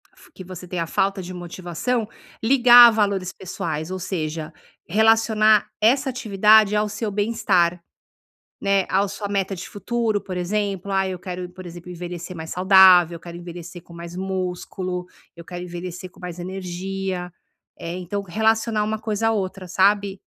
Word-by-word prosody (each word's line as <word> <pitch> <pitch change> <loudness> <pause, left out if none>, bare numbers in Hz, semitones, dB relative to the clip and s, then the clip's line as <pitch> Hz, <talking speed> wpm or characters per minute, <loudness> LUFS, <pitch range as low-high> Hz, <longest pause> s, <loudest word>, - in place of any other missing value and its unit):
f 360 - -20
que 185 - -10
você 180 -1 -9
tem 175 0 -4
a 165 - -2
falta 195 +2 0
de 185 +1 -8
motivação, 180 +6 -3 0.3
ligar 240 0 +8
a - - +5
valores 200 -4 0
pessoais, 160 -3 -5
ou 185 - -4
seja, 160 -4 -4 0.3
relacionar 220 +1 +4
essa 265 +5 +3
atividade 215 -3 +4
ao 210 0 +1
seu 210 +1 -4
bem-estar, 180 -5 +1 0.8
né, 195 -1 +2
ao 195 +2 +2
sua 205 +1 -5
meta 195 -1 -1
de 180 - -8
futuro, 220 +1 -1
por 190 -2 -7
exemplo: 200 +1 -2
"Ah, 190 0 +1
eu 185 -1 -4
quero, 180 0 -6
por 185 0 -11
exemplo, 175 +1 -10
envelhecer 175 +1 -7
mais 160 -1 -7
saudável. 180 -2 +6
Eu - - -13
quero 170 0 -9
envelhecer 175 0 -9
com 170 - -17
mais 170 +1 -9
músculo. 185 -1 -4 0.3
Eu 170 - -11
quero 175 +1 -7
envelhecer 180 +1 -7
com - - -20
mais 180 -1 -7
energia.". 185 0 -4 0.5
Eh, 170 +2 -5
então 185 +3 -4
relacionar 220 +3 +1
uma 220 0 -2
coisa 220 0 -1
à - - +2
outra, 190 -3 -4
sabe? 195 +1 +2
190 Hz, 165 wpm, -22 LUFS, 175-210 Hz, 0.8 s, ligar